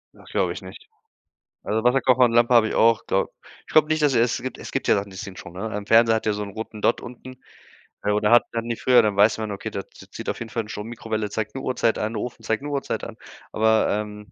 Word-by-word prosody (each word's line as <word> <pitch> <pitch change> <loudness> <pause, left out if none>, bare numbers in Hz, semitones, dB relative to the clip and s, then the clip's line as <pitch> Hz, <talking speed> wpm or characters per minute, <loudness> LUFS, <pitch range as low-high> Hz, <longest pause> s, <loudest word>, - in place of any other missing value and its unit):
Das - - -17
glaube - - 0
ich - - -8
nicht. - - -12 0.8
Also, 110 +1 -1
Wasserkocher 130 0 +4
und 120 - +4
Lampe 120 +1 +3
habe 115 -2 +6
ich - - -4
auch, 115 0 +3
glaube 95 - 0 0.4
ich - - -12
glaube 155 -1 +5
nicht, 155 0 +1
also, 140 -4 +3
es 120 +1 +1
gibt 130 - -5
es - - -9
gibt - - -2
ja - - +5
Sachen, 100 0 -3
die 95 - -11
ziehen 95 0 -7
Strom, 85 - -10
ne? 100 +5 -5
Ein 105 -1 -5
Fernseher 115 +1 +5
hat 110 - -3
ja 110 - +2
so 105 - -4
'n 100 - -7
roten 110 +1 -7
Dott 115 - +2
unten, 125 +1 -11 0.6
äh, 105 - +1
oder 105 +1 +1
hatten 120 -1 +2
die 115 - -1
früher. 125 -1 +5
Dann 105 -2 -1
weiß 105 +2 +4
man: 110 -1 -3
„Okay, 100 +2 -5
da 100 - -3
zi - - -16
zieht - - -6
auf - - -3
jeden 115 - -6
Fall 115 -2 -3
Strom.“ 105 0 -6
Mikrowelle 110 -2 -4
zeigt 110 +2 -4
'ne 135 - -4
Uhrzeit 125 -4 0
an, 110 +2 -2
Ofen 115 +1 -5
zeigt 110 +3 -1
'ne 145 - -4
Uhrzeit 140 -1 -3
an. - - -8 0.3
Aber, 110 0 +3
ähm, 105 0 -4
110 Hz, 265 wpm, -23 LUFS, 105-120 Hz, 0.8 s, habe